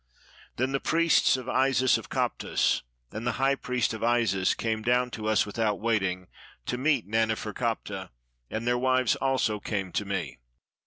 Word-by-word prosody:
Then 130 +2 0
the 135 - 0
priests 165 -3 +3
of 130 -1 -8
Isis 130 -1 +3
of - - -4
Koptos, - - 0 0.3
and 110 +3 -5
the 120 - +1
high 135 +3 +2
priest 125 -4 -1
of 110 - -6
Isis, 115 -6 +2
came 110 -1 -2
down 125 +2 +1
to 110 -2 -5
us 110 -1 +3
without 105 0 -1
waiting, 95 -5 0 0.4
to 125 - -2
meet 140 -3 +2
Nane 110 +2 +1
ferkaptah, 105 -4 -4 0.4
and 110 +2 -4
their 120 0 +1
wives 130 -1 +2
also 130 -5 0
came 100 -3 -3
to 105 - -1
me. 90 -11 -4
115 Hz, 165 wpm, -27 LUFS, 105-130 Hz, 0.4 s, priests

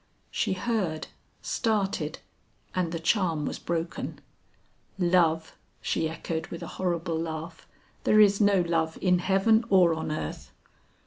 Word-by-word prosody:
She - - 0
heard, 185 -6 -2 0.3
started, 195 - -1 0.6
and 180 -3 0
the 165 - -2
charm 165 -3 +1
was - - -4
broken. 170 0 -3 0.8
"Love!" 170 -3 +2 0.2
she 160 - -1
echoed 160 0 -4
with 170 - -7
a - - -6
horrible 170 -2 -1
laugh; 165 0 -6 0.4
"there 215 - +5
is 205 0 +6
no 200 -2 +5
love 165 -2 0
in 180 -2 +3
heaven 195 +5 +3
or 180 -4 +5
on 160 -1 -3
earth!" 155 - -5
170 Hz, 130 wpm, -27 LUFS, 160-195 Hz, 0.8 s, is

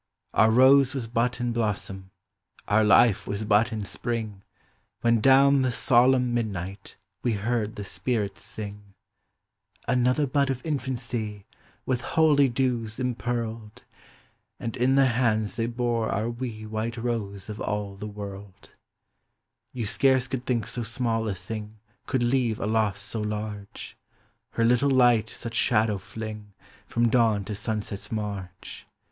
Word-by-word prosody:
Our 110 - +5
Kose 135 +3 +6
was 130 -4 -2
but 120 +1 -1
in 120 -1 -1
blossom. 100 -4 -2 0.6
Our 110 +1 +4
life 105 0 +4
was 100 +1 -3
but 110 +3 +3
in 110 -2 -3
spring, 110 -3 -3 0.6
When 115 -1 +3
down 135 +2 +6
the 130 -1 +1
solemn 125 0 +3
midnight 100 -4 -4 0.2
We 120 - 0
heard 110 +1 -1
the 105 - -5
spirits 100 0 -2
sing. 100 -1 -8 0.4
" - - -58 0.2
Another 125 +4 +2
bud 140 +1 +1
of 130 -1 -3
infam 135 -5 -2 0.2
y 105 -4 -4 0.4
With 125 -2 0
holy 145 -1 +3
dews 120 -3 -1
impearled! 115 -2 -3 0.4
" - - -39
And 115 - -4
iu 130 +2 +2
their 135 0 +5
hands 115 -4 +1
they 115 0 0
bore 120 -1 -1
our 110 +3 -1
wee 115 -3 -6
White 110 +2 -3
Kose 110 -5 -3
of 105 -1 -7
all 105 -1 -3
the 105 +2 -7
woil;!. 100 -2 -8 1.2
You 120 -3 -4
scarce 130 +3 +2
could 130 -1 -5
think 120 -4 0
so 120 - -3
small 115 -1 -1
a 100 - -2
thing 105 +3 -7 0.3
Could 130 -3 0
leave 120 -3 +1
a - - -2
loss 105 -2 +1
so 110 +2 -3
large; 105 -1 -5 0.6
Her 115 - +1
little 125 +4 +3
light 120 -4 +4
such 115 -1 -7
shadow 110 -3 +2 0.2
lling 105 -2 -6 0.3
From 120 0 +1
dawn 110 -4 +2
to 105 - -4
sunset's 105 -1 -4
marge. 100 -4 -6
115 Hz, 150 wpm, -26 LUFS, 105-125 Hz, 1.2 s, Kose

